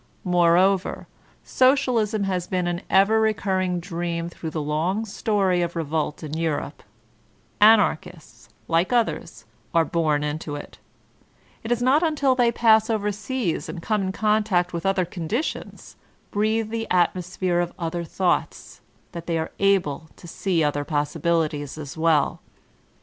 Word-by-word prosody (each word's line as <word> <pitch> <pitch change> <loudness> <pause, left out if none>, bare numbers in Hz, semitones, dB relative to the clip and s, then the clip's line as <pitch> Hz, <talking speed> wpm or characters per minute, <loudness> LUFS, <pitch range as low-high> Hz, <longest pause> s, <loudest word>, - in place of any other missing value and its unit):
Moreover, 180 +2 +2 0.4
Socialism 250 -6 +2
has 185 -3 -2
been 180 -1 -1
an 175 +1 -2
ever 205 +3 +4
recurring 190 -4 0
dream 170 -1 -4
through 165 -1 -7
the 160 - -4
long 160 +8 -1
story 195 -4 0
of 175 0 -2
revolt 155 -1 -2
in 150 -1 -6
Europe; 160 -3 -3 0.8
Anarchists, 175 - +2 0.2
like 165 +5 +1
others, 240 -2 -1 0.3
are 165 -1 +4
bom 155 -4 0
into 150 0 -4
it 145 - -10 0.8
It 225 - -5
is 240 0 +1
not 270 +5 +4
until 300 -5 +2
they 245 -2 +3
pass 220 -1 +4
over 210 -2 0
seas, 210 -2 -3
and 175 - -6
come 210 +4 -1
in 190 -1 -1
con 215 +2 +1
tact 180 -4 0
with 170 +2 -2
other 195 -2 +1
conditions, 180 - -5 0.3
breathe 220 +1 0
the 225 0 -3
atmosphere 180 0 0
of 175 0 -1
other 170 -1 -3
thoughts, 175 +2 -2 0.3
that 170 -2 -8
they 165 -1 0
are 160 - -3
able 175 -6 +1
to 175 - -13
see 170 -1 0
other 145 -1 0
possibili 160 +2 0
ties 145 -1 -7
as 145 -3 -7
well. 160 -3 +1
180 Hz, 145 wpm, -23 LUFS, 165-215 Hz, 0.8 s, ever